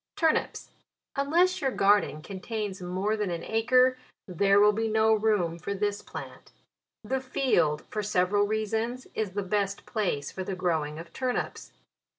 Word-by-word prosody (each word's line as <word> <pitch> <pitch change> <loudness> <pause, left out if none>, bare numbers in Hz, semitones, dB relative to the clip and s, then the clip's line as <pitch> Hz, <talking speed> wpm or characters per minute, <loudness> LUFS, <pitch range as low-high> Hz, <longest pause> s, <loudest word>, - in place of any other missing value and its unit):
TURNIPS. 320 -1 0 0.4
Unless 335 +7 +2
your 270 - +2
garden 200 - +2
contains 200 +1 -5
more 185 +4 -1
than 210 -3 -2
an 170 -1 -4
acre, 255 +3 +3 0.3
there 195 +2 +3
will 210 +1 +6
be 225 +2 -1
no 220 0 +3
room 205 -6 +1
for 200 +4 -4
this 205 0 -1
plant. - - -10 0.5
The 260 +5 -1
field, 175 - +1
for 215 - -1
several 205 0 +2
reasons, 220 +4 -2
is 210 -4 -2
the 205 0 -2
best 200 +1 -1
place 180 - -2
for 190 - -5
the 190 0 -4
growing 160 -4 -1
of 165 +1 -10
turnips. 255 -1 -3
205 Hz, 155 wpm, -28 LUFS, 185-225 Hz, 0.5 s, will